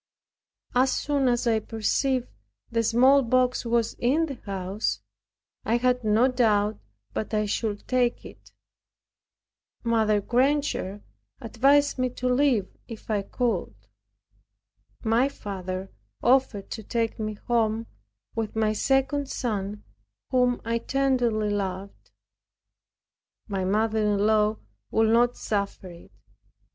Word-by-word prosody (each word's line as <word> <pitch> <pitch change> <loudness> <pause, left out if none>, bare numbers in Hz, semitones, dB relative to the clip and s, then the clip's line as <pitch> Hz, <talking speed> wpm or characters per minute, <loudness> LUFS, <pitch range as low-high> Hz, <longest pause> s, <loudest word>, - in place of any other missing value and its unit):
As 255 +1 +3
soon 285 -2 0
as 240 0 +1
I 225 -2 +3
perceived 240 +4 -1 0.4
the 230 0 +1
smallpox 255 +1 +3
was 230 -1 +1
in 285 +7 +2
the 275 -6 -8
house, 195 +1 -2 0.6
I 230 - +1
had 250 0 +1
no 220 +4 +4
doubt 215 -5 +1 0.3
but 215 +1 -3
I 210 0 +1
should 205 0 -3
take 250 -2 +1
it. - - -14 1.3
Mrs. 215 -3 +2
Granger 250 -6 0 0.4
advised 275 +5 +2
me 255 0 +1
to 255 - -2
leave 250 -6 +2
if 225 -1 -8
I 205 -2 +1
could. 200 - -2 1.3
My 235 +4 +3
father 190 -5 -6 0.3
offered 245 -5 +2
to 220 - -5
take 225 +1 -2
me 215 -1 -3
home, 225 0 0 0.5
with 225 -2 -3
my 215 -1 +1
second 270 +4 +1
son, 210 -5 -3 0.5
whom 250 -1 +2
I 230 0 0
tenderly 245 -6 +1
loved. 195 -1 -4 1.4
My 195 -3 -2
mother 220 +3 +1
in 210 -1 +2
law 215 0 +3 0.3
would 220 0 +2
not 240 +1 +3
suffer 200 -3 -3
it. 170 0 -15
230 Hz, 115 wpm, -26 LUFS, 210-255 Hz, 1.4 s, no